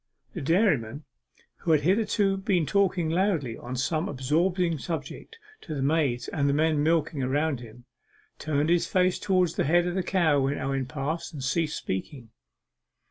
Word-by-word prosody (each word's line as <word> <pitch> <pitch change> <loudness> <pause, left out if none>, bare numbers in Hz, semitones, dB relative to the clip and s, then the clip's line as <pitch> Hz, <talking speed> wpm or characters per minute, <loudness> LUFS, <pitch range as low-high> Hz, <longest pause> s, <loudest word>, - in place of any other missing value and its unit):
The - - -5
dairyman, 150 - +1 0.5
who 165 - +1
had 150 - +3
hitherto 200 +3 +2
been 190 -4 +1
talking 180 0 +1
loudly 165 - 0
on 125 +2 -7
some 155 +8 -1
absorbing 165 +5 0
subject 170 - -6 0.2
to 155 - -6
the 135 - -2
maids 140 -4 +1
and 140 -2 0
men 155 -1 +2
milking 160 -2 +1
around 140 +2 0
him, 120 +1 -13 0.5
turned 150 0 0
his 175 -1 +2
face 185 -1 +1
towards 185 -5 +1
the - - +2
head 175 +4 +3
of 175 - -2
the 190 - 0
cow 170 -6 +2
when 135 +1 0
Owen 135 -1 -2
passed, 150 +5 -4
and 140 -4 -6
ceased 155 +4 0
speaking. 115 - -5
155 Hz, 160 wpm, -27 LUFS, 135-175 Hz, 0.5 s, had